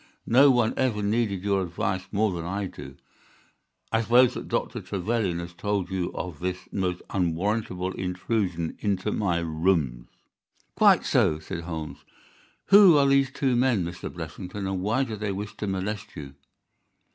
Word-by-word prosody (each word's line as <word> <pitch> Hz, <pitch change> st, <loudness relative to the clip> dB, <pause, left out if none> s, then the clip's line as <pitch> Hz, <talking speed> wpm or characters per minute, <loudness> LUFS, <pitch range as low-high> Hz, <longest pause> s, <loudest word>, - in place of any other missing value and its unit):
No 135 Hz, +5 st, +6 dB
one 120 Hz, -4 st, +3 dB
ever 115 Hz, -6 st, 0 dB
needed 100 Hz, -3 st, 0 dB
your 100 Hz, -1 st, +1 dB
advice 95 Hz, +2 st, -2 dB
more 105 Hz, 0 st, +1 dB
than 85 Hz, -2 st, -4 dB
I 100 Hz, +4 st, -3 dB
do. -, -, -9 dB, 1.0 s
I 115 Hz, -, +2 dB
suppose 120 Hz, +2 st, +5 dB
that -, -, -6 dB
Dr. -, -, -2 dB
Trevelyan 100 Hz, -2 st, -1 dB
has 85 Hz, 0 st, -6 dB
told 100 Hz, 0 st, -2 dB
you 95 Hz, -2 st, -2 dB
of 90 Hz, -5 st, -5 dB
this 90 Hz, 0 st, -2 dB
most 90 Hz, -2 st, -2 dB
unwarrantable 95 Hz, +1 st, -1 dB
intrusion 90 Hz, -2 st, -2 dB
into 100 Hz, 0 st, -1 dB
my 95 Hz, -6 st, 0 dB
rooms." 80 Hz, -7 st, 0 dB, 0.7 s
"Quite -, -, +5 dB
so," 75 Hz, -, +3 dB
said 85 Hz, +2 st, -7 dB
Holmes. 80 Hz, -3 st, -6 dB, 0.7 s
"Who 195 Hz, -5 st, +8 dB
are 140 Hz, -, +4 dB
these 135 Hz, -1 st, +3 dB
two 130 Hz, -1 st, 0 dB
men 120 Hz, -7 st, +2 dB
Mr. 85 Hz, 0 st, -6 dB
Blessington, 90 Hz, +4 st, -6 dB
and 95 Hz, -1 st, -2 dB
why 110 Hz, +7 st, +1 dB
do 115 Hz, -5 st, -4 dB
they 105 Hz, -1 st, -3 dB
wish 100 Hz, +2 st, -5 dB
to 105 Hz, -, -4 dB
molest 95 Hz, +1 st, -4 dB
you?" 70 Hz, -2 st, -8 dB
95 Hz, 155 wpm, -26 LUFS, 90-110 Hz, 1.0 s, Who